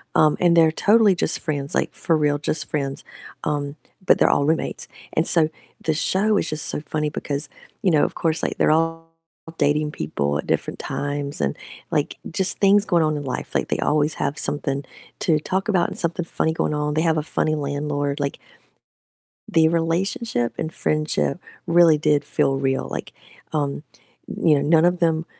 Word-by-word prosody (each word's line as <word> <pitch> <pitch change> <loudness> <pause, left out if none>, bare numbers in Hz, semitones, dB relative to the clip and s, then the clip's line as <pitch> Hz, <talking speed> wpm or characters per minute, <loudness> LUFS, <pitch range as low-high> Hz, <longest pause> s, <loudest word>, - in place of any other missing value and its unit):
Um, 155 -1 +4
and 175 -1 +4
they're 165 -1 +5
totally 205 +2 +4
just - - +1
friends, 145 -3 -3
like - - -1
for 165 - +1
real 145 -1 +1
just 150 +1 -2
friends, 140 -2 -3 0.4
um, 145 0 -2 0.3
but - - +4
they're - - +4
all 140 - +2
roommates 160 +1 -1 0.3
and 160 - +2
so 160 -3 +5 0.3
the 160 - +1
show 200 +6 +2
is - - 0
just 155 0 0
so - - 0
funny 150 0 -2
because, 145 0 -4 0.3
you 195 - +4
know, 150 -2 +4
of - - -4
course 165 -1 0
like - - -2
they're - - +3
all 165 +1 0 0.5
dating 150 +1 +1
people 75 - -2
at - - -5
different - - -1
times 145 - -4
and, 70 -1 -1 0.3
like, - - -1
just 190 +3 +2
things 200 +1 +4
going 170 -4 +2
on 155 -1 0
in 145 - -5
life, 130 - -5
like - - 0
they - - -1
always 150 0 +1
have 145 - -2
something 140 -1 -1 0.4
to 155 -3 +2
talk 190 +6 -2
about 185 -5 +2
and - - -7
something 170 +1 -1
funny 160 -1 -1
going 155 - -1
on. 150 0 -1
They 155 - +1
have 160 -1 +2
a 155 - 0
funny 155 0 0
landlord. 145 0 -2
Like 140 -1 -3 1.1
the 160 -1 +4
relationship 165 - -1
and 160 0 -4
friendship 155 +1 -1 0.3
really 170 -2 +5
did 150 -1 +1
feel 135 - +1
real. 135 -1 -1
Like, - - -5 0.4
um, 145 -1 -2 0.4
you 155 -2 +2
know, 140 - +1
none 160 +3 +4
of 175 0 +2
them 165 -2 +1
155 Hz, 185 wpm, -22 LUFS, 145-165 Hz, 1.1 s, they're